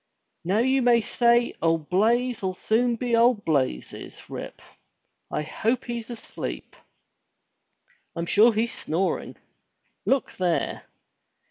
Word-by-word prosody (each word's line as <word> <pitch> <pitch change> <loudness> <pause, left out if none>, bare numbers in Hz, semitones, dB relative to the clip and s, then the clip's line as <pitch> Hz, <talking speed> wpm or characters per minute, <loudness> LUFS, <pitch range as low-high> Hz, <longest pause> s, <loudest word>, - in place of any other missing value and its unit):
"Now 185 +5 +1
you 260 +3 +3
may 240 -1 +5
say 235 +2 +2
old 165 -2 +1
Blaize'll 220 -1 +1
soon 235 +5 +1
be 235 0 0
old 230 -2 +3
Blazes, 130 - -2
Rip. - - -7 0.7
I 150 - -2
hope 225 - -1
he's 235 -1 -5
asleep.*' 235 -2 -7 1.4
"Fm 170 0 -3
sure 220 +6 +6
he's 225 +2 -1
snoring! 180 +5 -2 0.7
Look 270 -1 +1
there! 180 -3 -1
225 Hz, 110 wpm, -25 LUFS, 180-240 Hz, 1.4 s, sure